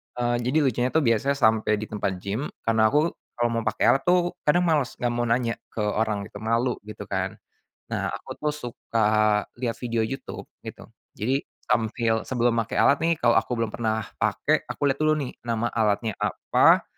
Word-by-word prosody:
eee, 120 0 0
jadi 125 +6 0
lucunya 125 -2 +1
itu 155 +3 +1
biasanya 120 +4 +2
sampai 110 -4 +3
di 110 +1 -6
tempat 100 -3 -1
gym 105 +9 -2 0.2
karena 110 -1 +3
aku, 150 +7 +2 0.2
kalau 120 0 +1
mau 115 -1 -1
pakai - - 0
alat 135 - +1
tuh 175 0 +3 0.2
kadang 175 +4 +4
males 155 -6 +1
nggak 120 -1 -1
mau 120 0 -1
nanya 115 0 0
ke 110 - -4
orang 105 -1 0
gitu 100 0 -10
malu 115 +3 0
gitu 105 - -7
kan, - - -3 0.5
nah - - -2
aku - - -7
tuh 150 - +2
suka 120 -5 -2 0.5
lihat 120 -2 -2
video 115 -2 -1
YouTube 135 +5 -5 0.2
gitu - - -8 0.3
jadi 130 +6 0 0.2
sambil 110 +1 +1
sebelum 120 -2 +2
make 115 +2 -3
alat 140 - +4
nih 165 +1 +2
kalau 120 - +5
aku 125 - -4
belum 115 -2 -1
pernah 110 -1 -1 0.2
pakai - - +1
aku - - -5
lihat 135 - -5
dulu 155 0 +3
nih 140 -4 -3 0.2
nama 115 0 0
alatnya 110 0 +1
apa, - - +3
120 Hz, 185 wpm, -25 LUFS, 110-135 Hz, 0.5 s, kalau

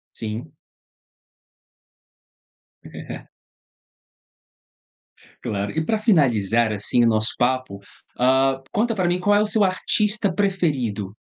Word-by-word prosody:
Sim. 110 +1 -6 2.3
É - - -9 2.2
Claro. 100 0 -3
E 160 0 -2
pra 220 +7 0
finalizar, 120 - +2
assim, 105 +3 +1
o 115 - +4
nosso 110 0 +1
papo, 125 -5 -1 0.4
hã, 135 +1 +2
conta 230 +2 0
pra 185 -5 0
mim 175 +1 0
qual 205 +2 +2
é 205 - +4
o 210 - +1
seu 215 -1 +2
artista 205 +2 0
preferido? 145 - -1
135 Hz, 105 wpm, -22 LUFS, -, 2.3 s, o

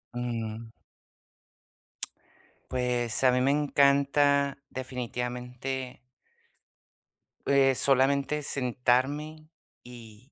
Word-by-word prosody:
Mm. 115 -2 -4 2.0
Pues 125 -1 -1
a 130 - +6
mí 125 - +1
me 130 - +2
encanta 140 0 +3
definitivamente 125 0 -5 1.5
eh, 135 -1 +4
solamente 140 +3 +2
sentarme 140 +5 -1 0.3
y 120 +1 -14
130 Hz, 65 wpm, -28 LUFS, 125-140 Hz, 2.0 s, a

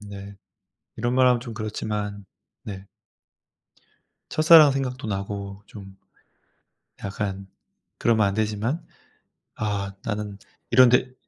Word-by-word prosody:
네 100 -1 -9 0.6
이런 120 +2 -1
말 130 0 +5
하면 125 -1 +4
좀 120 -2 -8
그렇지만 105 -2 -4 0.4
네. 95 -2 -8 1.4
첫사랑 155 -2 +7
생각도 130 -3 -3
나고 100 0 -5
좀 95 -2 -12 1.1
약간 100 -1 -4 0.5
그러면 110 -3 +3
안 100 - -1
되지만. 110 +7 -1 0.7
'아 100 -2 -2
나는 105 -2 -4 0.3
이런데' 125 +1 +5
105 Hz, 190 characters per minute, -24 LUFS, 100-120 Hz, 1.4 s, 첫사랑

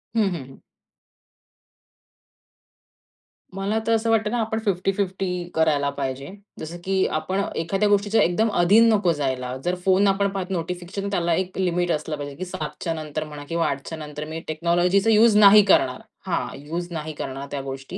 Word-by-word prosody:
हं, 225 - +3
हं, 150 -6 -5
हं. 135 - -14 3.0
मला 195 +3 -1
तर - - +2
असं 225 0 +1
वाटतं 220 -1 +2
ना 245 - 0
आपण 220 0 -2
50-50 195 0 -1 0.3
करायला 150 -3 +2
पाहिजे. 135 0 -4 0.3
जसं 165 +2 -6
की 190 0 +1
आपण 190 +5 -2
एखाद्या 195 +6 0
गोष्टीचं 205 +2 +2
एकदम 215 +5 +2
अधीन 215 +6 +6
नको 195 -5 +2
जायला. 130 -4 -2
जर 180 +1 0
फोन 190 +1 +4
आपण 200 +1 +2
पाहत 195 -1 -4
नोटिफिकेशन 180 +3 -4
त्याला 170 -3 +1
एक 185 +2 -2
लिमिट 175 -1 0
असलं 155 0 -2
पाहिजे 145 -1 -6
की 185 - -5
7:00 155 -4 -5
च्या 165 -2 -1
नंतर 155 -1 -4
म्हणा 150 -1 -9
किंवा 165 0 0
8:00 140 0 -3
च्या 160 - -5
नंतर 150 -1 -7
मी 160 +1 -5
टेक्नॉलॉजीचा 175 +6 +2
युज 220 0 +5
नाही 210 0 +9
करणार 135 -5 +3 0.2
हां, 165 -9 -1
युज 165 +5 -5
नाही 155 -1 -5
करणार 135 -1 -6
त्या 140 -1 -3
गोष्टी, 135 +6 -7
175 Hz, 170 wpm, -23 LUFS, 150-195 Hz, 3.0 s, नाही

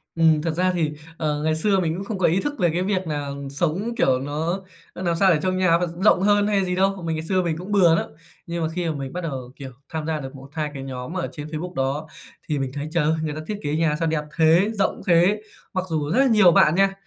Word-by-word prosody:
Ừm, 160 -2 +4
thật 165 +1 -1
ra 180 +3 +1
thì, 160 -4 -1 0.2
ờ, 150 -2 -1
ngày 155 0 +1
xưa 195 +4 +2
mình 165 -3 0
cũng 190 - -5
không 215 -1 -4
có 185 - +3
ý 175 +4 +2
thức 290 - -2
về 175 -3 +3
cái 170 +3 -1
việc 190 -2 -1
nà 145 -2 -3 0.2
sống, 175 +11 -1
kiểu, 130 -1 +3
nó 160 +7 -2 0.3
nó - - -7
làm 170 -2 0
sao 190 +2 +4
để 155 - +1
trong 185 0 0
nhà 185 -3 +4
vận 170 0 -4
rộng 190 -2 +5
hơn 205 +1 +3
hay 200 -2 +2
gì 180 0 -1
đâu. 195 0 +1
Mình 165 -1 -1
ngày 160 0 -4
xưa 185 +1 +1
mình 165 -2 -1
cũng 185 +4 -7
bừa 180 -5 +5
lắm, - - 0 0.4
nhưng 170 0 -3
mà 160 - 0
khi 175 -1 -1
mà 155 - -2
mình 135 -2 -6
bắt 180 - -3
đầu, 130 -7 -5
kiểu, 135 -2 -8 0.2
tham 160 -1 -4
gia 160 -1 -1
được 135 -1 -8
1-2 150 +3 -5
cái 135 -2 -6
nhóm 130 +3 -6
ở 180 - -1
trên 150 -2 -7
Facebook 160 +4 -5
đó, 140 +3 -2 0.4
thì 150 -3 -1
mình 135 -1 -2
thấy 145 +1 -4
trời 165 -2 +1
ơi, 155 +2 +2
người 155 -1 -2
ta 155 - -5
thiết 210 - -3
kế 145 +1 -1
nhà 160 -1 +1
sao 165 - 0
đẹp 155 -1 0
thế, 165 +5 +4
rộng 200 -3 -1
thế. 180 +4 +4 0.3
Mặc 185 -2 -1
dù 155 -3 -1
rất 245 - +2
là 275 - +5
nhiều 210 -6 +6
bạn 155 -1 +5
nha, 195 +1 +3
165 Hz, 280 wpm, -23 LUFS, 150-185 Hz, 0.4 s, nhiều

